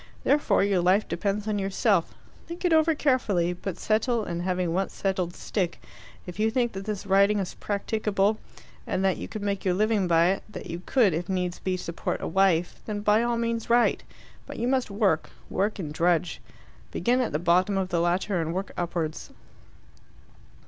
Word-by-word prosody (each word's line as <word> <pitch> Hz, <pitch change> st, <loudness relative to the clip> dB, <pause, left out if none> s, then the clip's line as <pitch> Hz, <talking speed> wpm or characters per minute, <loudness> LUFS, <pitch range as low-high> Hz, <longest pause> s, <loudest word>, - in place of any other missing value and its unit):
Therefore 290 Hz, -7 st, +3 dB
your 195 Hz, -3 st, +2 dB
life 185 Hz, +4 st, +3 dB
depends 205 Hz, +1 st, -2 dB
on 210 Hz, -1 st, 0 dB
yourself. 195 Hz, 0 st, +1 dB, 0.3 s
Think 340 Hz, +2 st, -6 dB
it 350 Hz, -, +3 dB
over 320 Hz, 0 st, +4 dB
carefully, 210 Hz, -, +1 dB
but 180 Hz, 0 st, -6 dB
settle, 225 Hz, +1 st, +1 dB
and 170 Hz, -3 st, -4 dB
having 180 Hz, -2 st, -1 dB
once 190 Hz, +2 st, -1 dB
settled, 185 Hz, -3 st, -1 dB
stick. 180 Hz, -5 st, -2 dB, 0.5 s
If 180 Hz, +2 st, -9 dB
you 220 Hz, +1 st, +3 dB
think 240 Hz, 0 st, 0 dB
that 195 Hz, 0 st, -7 dB
this 210 Hz, -2 st, -4 dB
writing 200 Hz, +2 st, +4 dB
is 195 Hz, -3 st, -3 dB
practicable, 210 Hz, 0 st, -1 dB, 0.5 s
and 190 Hz, -, 0 dB
that 190 Hz, -, +2 dB
you -, -, -6 dB
could 215 Hz, -2 st, -6 dB
make 200 Hz, -1 st, -2 dB
your 185 Hz, -2 st, +1 dB
living 210 Hz, -1 st, +2 dB
by 170 Hz, 0 st, +4 dB
it 195 Hz, -, -1 dB
that 210 Hz, -, -8 dB
you 170 Hz, +1 st, -5 dB
could, 230 Hz, -9 st, +3 dB
if 170 Hz, +4 st, -3 dB
needs 180 Hz, -1 st, -2 dB
be, 185 Hz, -1 st, -1 dB
support 170 Hz, -1 st, -4 dB
a -, -, -4 dB
wife 175 Hz, -1 st, +2 dB
then 210 Hz, -1 st, -3 dB
by 210 Hz, +1 st, +3 dB
all 240 Hz, 0 st, 0 dB
means 230 Hz, 0 st, -2 dB
write. 240 Hz, +1 st, +3 dB, 0.5 s
But -, -, -8 dB
you 235 Hz, -, -1 dB
must 260 Hz, -2 st, +1 dB
work. 200 Hz, -6 st, +1 dB, 0.2 s
Work 205 Hz, +3 st, 0 dB
and 155 Hz, -6 st, -5 dB
drudge. 170 Hz, 0 st, +1 dB, 0.5 s
Begin 250 Hz, +2 st, +1 dB
at 245 Hz, -, -1 dB
the 150 Hz, -, 0 dB
bottom 180 Hz, +4 st, +2 dB
of 190 Hz, -1 st, -1 dB
the 170 Hz, -2 st, +1 dB
ladder 175 Hz, +1 st, 0 dB
and 165 Hz, +1 st, -3 dB
work 190 Hz, +1 st, -3 dB
upwards." 170 Hz, -3 st, -3 dB
195 Hz, 190 wpm, -26 LUFS, 180-215 Hz, 0.5 s, over